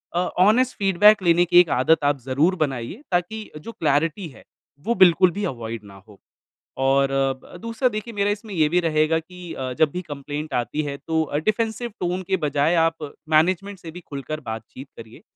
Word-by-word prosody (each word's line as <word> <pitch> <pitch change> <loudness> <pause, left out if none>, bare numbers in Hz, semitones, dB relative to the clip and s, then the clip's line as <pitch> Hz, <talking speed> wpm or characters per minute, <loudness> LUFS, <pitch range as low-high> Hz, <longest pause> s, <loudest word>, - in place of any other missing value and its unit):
अ, - - +2 0.2
honest 235 +7 +4
feedback 205 +1 +5
लेने 175 0 +4
की 175 0 +6
एक 180 -2 +5
आदत 145 +5 +2
आप 145 -1 +1
ज़रूर 135 +9 +1
बनाइये, 135 - -3
ताकि 185 +5 -2
जो 150 +10 -9
क्लैरिटी 165 +1 0
है, 135 - -16 0.4
वो 235 - +1
बिल्कुल 180 0 +6
भी 205 +5 -5
अवॉइड 115 - -5
ना 100 -1 -13
हो। 105 -2 -16 0.6
और 135 +1 +2 0.3
ब - - -12
दूसरा, 230 +2 0
देखिए 215 +1 -6
मेरा 200 -1 0
इसमें 205 0 -6
ये 155 -4 +2
भी 175 +3 +2
रहेगा 160 -1 +1
कि 180 +1 -10
अ, 130 -1 -4
जब 150 +3 +2
भी 180 - -4
कम्प्लेन्ट 145 +2 -6
आती 120 +6 -3
है, 140 -1 -5
तो 160 +2 -1
अ, 145 -1 -3
डिफेंसिव 220 +6 -1
टोन 180 +1 -2
के 190 - +2
बजाय 145 +3 +1
आप 160 -3 -4 0.2
मैनेजमेंट 185 +5 +1
से 165 -2 -9
भी 180 +2 -10
खुलकर 140 +2 -5
बातचीत 115 +5 -8
करिए। 115 0 -12
165 Hz, 190 wpm, -23 LUFS, 140-190 Hz, 0.6 s, की